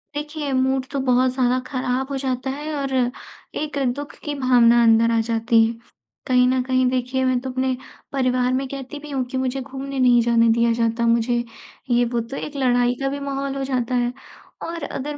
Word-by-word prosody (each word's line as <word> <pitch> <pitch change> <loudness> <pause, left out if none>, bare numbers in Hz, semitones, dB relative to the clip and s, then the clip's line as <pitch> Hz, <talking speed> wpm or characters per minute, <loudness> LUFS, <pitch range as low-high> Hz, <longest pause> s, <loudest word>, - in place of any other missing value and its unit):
देखिए 295 -1 -4
मूड 260 0 +1
तो 280 - -2
बहुत 255 -1 +2
ज़्यादा 255 -1 +2
खराब 255 -1 -2
हो 275 - -1
जाता 260 -1 -2
है 295 +3 -4
और 275 -2 -3 0.7
एक 300 -1 -4 0.2
दुख 290 0 -7
की 295 - -3
भावना 240 -2 +5
अंदर 230 0 +5
आ 230 - +2
जाती 230 0 +3
है। 225 - -2 0.5
कहीं 250 -1 +4
न 255 0 +2
कहीं 255 0 +1
देखिए 255 +1 -1
मैं 255 -1 +2
तो 260 - -5
अपने 260 0 0 0.4
परिवार 255 -2 +1
में 265 +1 -1
कहती 275 +1 -7
भी 300 +1 -11
हूँ 270 -2 0
कि 260 - -2
मुझे 260 +1 -1
घूमने 275 +1 -6
नहीं 245 -2 +5
जाने 230 0 +3
दिया 235 0 +2
जाता 230 0 0
मुझे, 235 +1 +2 0.5
ये 240 0 +3
वो 240 0 -1
तो 235 +4 -6
एक 300 - -6
लड़ाई 245 -2 +2
का 270 - 0
भी 285 +1 -4
माहौल 275 -1 -3
हो 270 - -2
जाता 255 -2 -1
है। 245 0 +1 0.5
और 335 -1 -5
अगर 290 +1 -4
255 Hz, 200 wpm, -22 LUFS, 245-275 Hz, 0.7 s, भावना